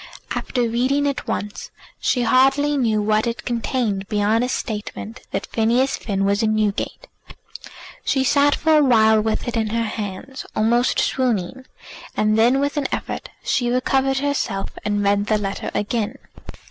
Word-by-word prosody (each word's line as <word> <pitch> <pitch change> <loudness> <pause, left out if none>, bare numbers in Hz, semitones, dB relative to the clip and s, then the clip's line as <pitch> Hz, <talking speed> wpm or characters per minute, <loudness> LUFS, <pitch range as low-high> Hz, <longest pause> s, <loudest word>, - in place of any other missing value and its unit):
After 245 -2 -1
reading 260 +5 +1
it 280 -2 -2
once 210 0 -4 0.3
she 250 - +1
hardly 270 +4 +3
knew 220 -6 +1
what 215 +2 +2
it 235 0 -4
contained 230 -4 -1
beyond 210 +2 +2
a 250 - -1
statement 220 0 -5
that - - -3
Phineas 240 +4 +1
Finn 195 -2 -2
was 200 +2 +1
in 215 -1 +2
Newgate. 210 -2 -1 1.0
She 265 - +1
sat 285 +2 +4
for 320 0 +2
a 300 - +5
while 220 -4 +5
with 220 +2 -2
it 240 - -2
in 220 -1 0
her 230 +1 0
hands, 215 +4 -5
almost 235 +3 +2
swooning; 255 0 -1 0.5
and 215 0 +2
then 240 +5 +4
with 285 +2 -1
an 280 -2 0
effort - - -4
she 250 -3 0
recovered 265 +2 +1
herself, 280 -8 -1
and 205 -1 0
read 200 +1 +2
the 215 - +2
letter 195 -1 -3
again. 210 +1 -1
230 Hz, 160 wpm, -21 LUFS, 210-265 Hz, 1.0 s, a